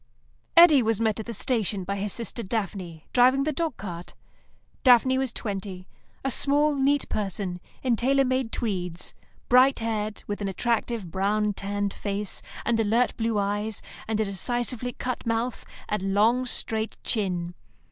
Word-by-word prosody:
Eddy 330 -5 +9
was 225 -2 +1
met 220 -1 +1
at 220 - -6
the - - -3
station 215 -3 0
by 200 +2 -3
his 200 +1 -2
sister 235 +2 -4
Daphne, 190 -6 -4
driving 260 +2 +5
the 305 - 0
dog 320 +2 -2
cart. 175 -3 -7 0.7
Daphne 260 +1 +5
was 265 -3 -1
twenty; 195 -4 -5 0.4
a 270 - +1
small, 290 +4 +3
neat 280 0 +2
person 195 -3 -3 0.2
in 250 -3 +2
tailor 270 +4 +3
made 255 -2 0
tweeds, 180 -6 -3 0.3
bright 255 +2 +6
haired, 215 -2 -2
with 205 0 -4
an 200 - -1
attractive 225 -1 -1
brown 205 +3 +1
tanned 200 0 -2
face, 200 -1 -4 0.2
and 230 -1 +2
alert 225 +3 +2
blue 225 -1 0
eyes, 205 +1 -2 0.2
and 220 -1 -1
a 220 - +2
decisively 240 +5 -2
cut 255 +2 -4
mouth, 230 +2 -1 0.2
and 195 -2 -1
long, 235 +5 +3
straight 220 -2 -2
chin. 180 -5 -1
220 Hz, 155 wpm, -26 LUFS, 200-250 Hz, 0.7 s, Eddy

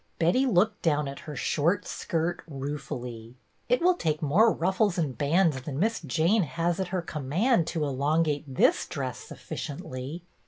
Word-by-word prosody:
Betty 180 +12 +3
looked 210 0 +2
down 150 -3 +1
at 140 0 -6
her 150 - -5
short 170 +8 +1
skirt 170 +1 -2
rue 145 0 -4
fully. 120 -2 -7 0.2
" - - -41
It 250 +7 +2
will 365 +1 +6
take 155 - -1
more 180 +10 +4
ruffles 190 +2 +1
and 150 -7 -1
bands 150 +1 +2
than 135 0 -5
Miss 220 +6 +1
Jane 165 - +2
has 170 +2 -1
at 190 - -1
her 180 -1 -2
command 165 - +1
to 160 - -1
elongate 145 +2 +1
this 130 - +3
dress 130 -3 -4
sufficiently." 140 +3 -7
160 Hz, 165 wpm, -27 LUFS, 140-185 Hz, 0.2 s, will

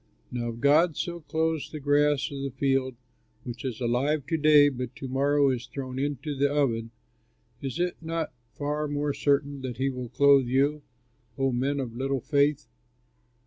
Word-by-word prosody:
Now 120 -1 -3
if 115 0 -7
God 150 +5 +4
so 170 -1 -3
clothes 160 -1 -1
the 155 - -7
grass 145 0 +2
of 140 -1 -5
the 140 - -2
field 135 -1 0 0.5
which 120 -1 -7
is 125 -5 -4
alive 130 +4 0
to 160 - +1
day 150 -1 +6
but 125 -2 -6
to 135 - -6
morrow 140 +1 +2
is 125 -1 -4
thrown 130 0 -6
into 145 +1 -2
the 140 +1 +1
oven, 120 -6 0 0.7
is 135 +1 -4
it 180 0 0
not 165 -2 -3 0.2
far 150 +1 -2
more 145 0 -1
certain 140 -1 0
that 125 -3 -5
he 135 +1 0
will 125 -2 -6
clothe 140 0 +5
you, 140 +4 +1 0.6
O 135 -1 +1
men 135 +3 0
of 120 -4 -4
little 135 +2 -1
faith? 145 -1 +1
140 Hz, 175 wpm, -27 LUFS, 130-145 Hz, 0.7 s, day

